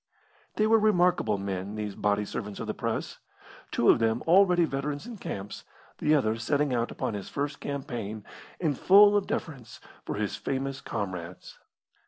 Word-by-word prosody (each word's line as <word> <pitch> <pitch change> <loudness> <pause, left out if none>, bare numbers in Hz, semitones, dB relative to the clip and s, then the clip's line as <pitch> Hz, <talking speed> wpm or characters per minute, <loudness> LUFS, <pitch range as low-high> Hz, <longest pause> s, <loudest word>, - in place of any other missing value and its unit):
They 215 - +2
were 225 +1 +5
remarkable 180 - +3
men 100 +1 -4
these 105 -1 -4
body 105 +1 0
servants 105 -1 -6
of - - -4
the - - -3
Press; - - -3 0.5
two - - 0
of - - +2
them 115 +1 +1
already 180 0 +5
veterans 145 +2 -3
in 235 -2 -8
camps, 100 - -6 0.4
the 150 +1 +3
other 110 -6 +1
setting 140 +4 0
out 120 -1 0
upon - - -3
his 100 -2 -6
first 145 0 -3
campaign, 120 -7 -5 0.3
and 155 -5 0
full 205 +7 +6
of 205 -1 +1
deference 135 -8 -5 0.2
for - - -4
his - - -2
famous 135 0 -3
comrades. 90 -3 -6
135 Hz, 165 wpm, -28 LUFS, 105-165 Hz, 0.5 s, full